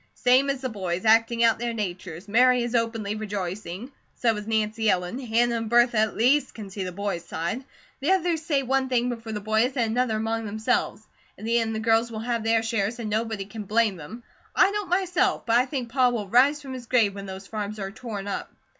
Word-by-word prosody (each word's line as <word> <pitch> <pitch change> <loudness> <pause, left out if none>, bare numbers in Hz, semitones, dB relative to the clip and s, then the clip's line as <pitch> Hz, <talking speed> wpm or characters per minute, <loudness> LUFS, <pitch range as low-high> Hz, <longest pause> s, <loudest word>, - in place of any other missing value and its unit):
"Same 255 +3 +4
as 275 -1 -1
the 260 - -2
boys, 185 -3 -3
acting 230 +1 +4
out 230 -2 +4
their 235 0 -2
natures. 185 -3 -5
Mary 250 +3 +4
is 240 0 -3
openly 225 -3 0
rejoicing. 205 +1 -5 0.2
So 230 -2 +1
is 210 0 -6
Nancy 220 0 0
Ellen. 180 +5 0
Hannah 235 -1 +1
and 225 -1 -4
Bertha 240 -1 +4
at 220 0 +1
least 265 +6 +3
can 205 -3 -8
see 195 0 -4
the 180 - -4
boys' 195 -2 -3
side. 170 +9 -3 0.4
The 280 - -1
others 350 -4 +2
say 295 -4 0
one 265 +1 0
thing 250 -1 +1
before 230 -2 -5
the 210 - -3
boys 220 +5 +1
and 230 -3 +1
another 240 -2 +1
among 225 0 -2
themselves. 215 +2 -1 0.3
In - - -9
the 235 +1 +2
end 225 -1 -1
the - - -2
girls 225 +1 +2
will 220 - -6
have 235 -1 -2
their 225 0 +2
shares 225 0 -1
and 220 -3 -4
nobody 220 -2 -1
can 210 +2 -8
blame 215 0 +2
them. 185 +9 -10 0.3
I 395 - +5
don't 415 -2 -3
myself, 375 +1 +1
but 230 - +2
I 255 - +1
think 255 -3 -4
Pa 255 +1 +3
will 225 -4 -3
rise 275 +7 +4
from 265 -1 -7
his 250 -2 -8
grave 225 -6 +3
when 200 0 -8
those 190 0 -8
farms 210 0 -5
are 195 -1 -4
torn 215 -3 -6
up." 200 - -4
225 Hz, 225 wpm, -25 LUFS, 210-245 Hz, 0.4 s, I